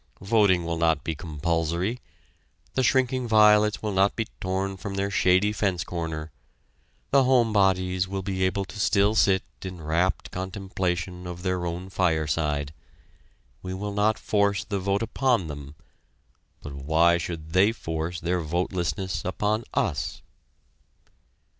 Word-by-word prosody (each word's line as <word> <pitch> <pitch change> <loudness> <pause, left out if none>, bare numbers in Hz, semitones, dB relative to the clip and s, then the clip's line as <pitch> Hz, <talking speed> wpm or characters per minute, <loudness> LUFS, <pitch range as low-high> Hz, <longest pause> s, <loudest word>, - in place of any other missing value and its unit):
Voting 100 -4 +3
will 85 -1 -2
not 80 -1 +2
be 80 - -2
compulsory; 85 - -2 0.7
the 130 - +1
shrinking 130 -1 +2
violets 105 -1 +5
will 105 - -1
not 95 +1 +2
be 115 - -1
torn 95 +1 -2
from 100 +1 -6
their 100 +1 -1
shady 95 +2 +3
fence 95 -5 0
corner; 80 -2 -5 0.8
the 135 -1 +5
"home 120 -4 +3
bodies" 95 -2 +2
will 95 0 -4
be 95 -1 -2
able 95 +1 0
to 105 - -10
still 100 +2 +3
sit 95 -3 +3 0.2
in 90 -2 -7
rapt 80 +4 0
contemplation 90 -2 -3
of 90 0 -7
their 90 -2 -1
own 85 +2 -5
fireside. 80 -5 0 0.9
We 95 0 -5
will 100 +1 -4
not 105 +2 +2
force 100 -1 +1
the 100 - -3
vote 100 +3 0
upon 120 -4 +1
them, 75 -1 -8 0.9
but 70 - -7
why 80 +5 +3
should 80 -2 -6
they 95 +4 +5
force 80 -5 -4
their 90 +1 -1
votelessness 90 +2 -2
upon 105 +4 -1
us? - - -1
95 Hz, 140 wpm, -26 LUFS, 85-100 Hz, 0.9 s, violets